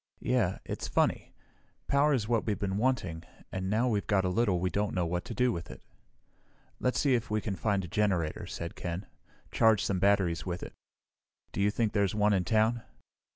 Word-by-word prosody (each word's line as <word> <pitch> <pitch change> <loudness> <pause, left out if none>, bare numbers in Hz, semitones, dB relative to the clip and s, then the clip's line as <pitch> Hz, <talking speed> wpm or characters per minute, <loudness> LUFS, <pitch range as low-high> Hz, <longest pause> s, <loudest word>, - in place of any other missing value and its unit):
"Yeah. 115 -7 +1
It's - - -4
funny, - - 0 0.5
power 140 +2 +3
is 120 -7 +1
what 115 -1 0
we've 105 -3 0
been 95 0 -2
wanting, 110 -10 0 0.3
and 95 0 -3
now 110 +5 +2
we've 105 -4 0
got 95 -2 +2
a - - +1
little 100 -2 +1
we 90 +1 -1
don't 105 0 -1
know 90 -1 +1
what 90 +2 -2
to 115 - -6
do 125 0 +3
with 85 -5 -5
it." - - -9 1.0
"Let's 125 - 0
see 140 -3 +3
if 120 -2 0
we 110 0 +1
can 105 -2 -3
find 95 +1 0
a - - -7
generator," 90 -4 0
said 85 0 -6
Ken. 90 +3 -4 0.5
"Charge 110 -3 +4
some 95 -2 0
batteries 95 -4 +2
with 90 -1 -4
it. - - -8 0.8
Do - - -2
you 100 - +4
think 110 0 0
there's 100 -2 +1
one 105 0 +3
in 95 -2 +1
town?" 110 +4 +2
100 Hz, 200 wpm, -30 LUFS, 90-115 Hz, 1.0 s, Charge